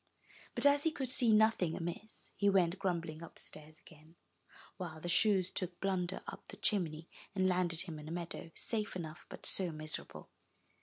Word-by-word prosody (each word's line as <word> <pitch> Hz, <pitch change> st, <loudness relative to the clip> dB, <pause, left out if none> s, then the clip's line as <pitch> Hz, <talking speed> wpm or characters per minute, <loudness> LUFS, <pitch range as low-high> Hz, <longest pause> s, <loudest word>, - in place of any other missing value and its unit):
But -, -, +1 dB
as 285 Hz, 0 st, +6 dB
he 320 Hz, -, +3 dB
could 270 Hz, -5 st, -3 dB
see 240 Hz, -3 st, +6 dB
nothing 215 Hz, -6 st, +4 dB
amiss, 175 Hz, +5 st, -5 dB
he 200 Hz, -, +3 dB
went 185 Hz, -2 st, +3 dB
grumbling 170 Hz, -5 st, -1 dB
upstairs 155 Hz, -2 st, -9 dB
again, 155 Hz, +1 st, -17 dB, 0.6 s
while 170 Hz, -4 st, -5 dB
the 175 Hz, -, -5 dB
shoes 190 Hz, 0 st, +3 dB
took 180 Hz, -2 st, -4 dB
Blunder 190 Hz, -1 st, -1 dB
up -, -, -8 dB
the -, -, -10 dB
chimney, 165 Hz, -6 st, 0 dB, 0.3 s
and 185 Hz, -1 st, +3 dB
landed 180 Hz, -3 st, +1 dB
him 165 Hz, -5 st, -5 dB
in 150 Hz, -, -9 dB
a -, -, -5 dB
meadow, 170 Hz, -1 st, -5 dB
safe 215 Hz, -4 st, -1 dB
enough, 160 Hz, -2 st, -6 dB
but -, -, -9 dB
so 185 Hz, -3 st, +4 dB
miserable! 155 Hz, 0 st, -6 dB
180 Hz, 170 wpm, -35 LUFS, 165-195 Hz, 0.6 s, as